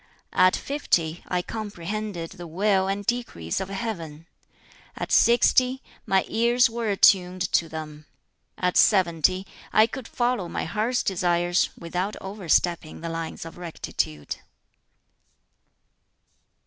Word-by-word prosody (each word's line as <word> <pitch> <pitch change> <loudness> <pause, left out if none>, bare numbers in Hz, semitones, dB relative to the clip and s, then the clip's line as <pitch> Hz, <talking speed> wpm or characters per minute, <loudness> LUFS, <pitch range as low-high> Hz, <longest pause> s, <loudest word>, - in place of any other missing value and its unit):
At 185 0 +5
fifty, 175 - -1
I 180 -1 -1
comprehended 205 -4 -5
the 175 -1 -9
will 190 +3 +1
and 200 +1 -2
decrees 235 - -2
of 190 - -5
Heaven. 170 -7 -5 0.7
At - - -5
sixty, 250 +2 +4 0.2
my 190 0 +3
ears 235 +1 +3
were 230 -1 -2
attuned 185 -2 +4
to 165 - +2
them. 155 -1 -8 0.5
At 180 -1 0
seventy, 185 -1 +3 0.3
I 215 - +6
could 240 +1 -7
follow 240 -7 -1
my - - -3
heart's 220 +8 0
desires, 175 -1 +1
without 180 +4 -3
overstepping 175 -5 0
the 165 - -4
lines 165 0 -5
of 165 +1 -10
rectitude." 75 - -4
185 Hz, 115 wpm, -25 LUFS, 170-215 Hz, 0.7 s, I